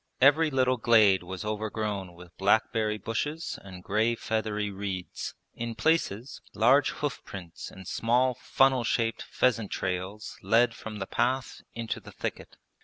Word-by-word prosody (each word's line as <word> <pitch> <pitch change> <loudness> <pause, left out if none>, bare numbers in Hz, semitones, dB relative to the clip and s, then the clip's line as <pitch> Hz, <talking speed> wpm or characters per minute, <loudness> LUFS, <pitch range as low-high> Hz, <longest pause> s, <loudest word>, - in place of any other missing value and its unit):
Every 145 +4 +6
little 130 -2 +2
glade 110 -5 +5
was 95 +3 -6
overgrown 105 -3 -3
with 90 0 -14
blackberry 105 +2 +2
bushes 145 - -3
and 95 -2 -10
grey 110 +4 +1
feathery 110 -2 -2
reeds. 95 -2 -5 0.2
In 115 -1 -4
places, 130 -6 0
large 140 +3 +5
hoof 145 -4 -3
prints 90 -4 -8
and 95 -2 -12
small 125 +3 +2
funnel 130 +1 +2
shaped 115 -1 0
pheasant 115 -5 +1
trails 95 +3 -4
led 115 +1 +4
from 110 -2 -7
the 95 - -3
path 125 +5 -1
into 115 -1 -3
the - - -12
thicket. - - -6
110 Hz, 140 wpm, -28 LUFS, 100-125 Hz, 0.2 s, Every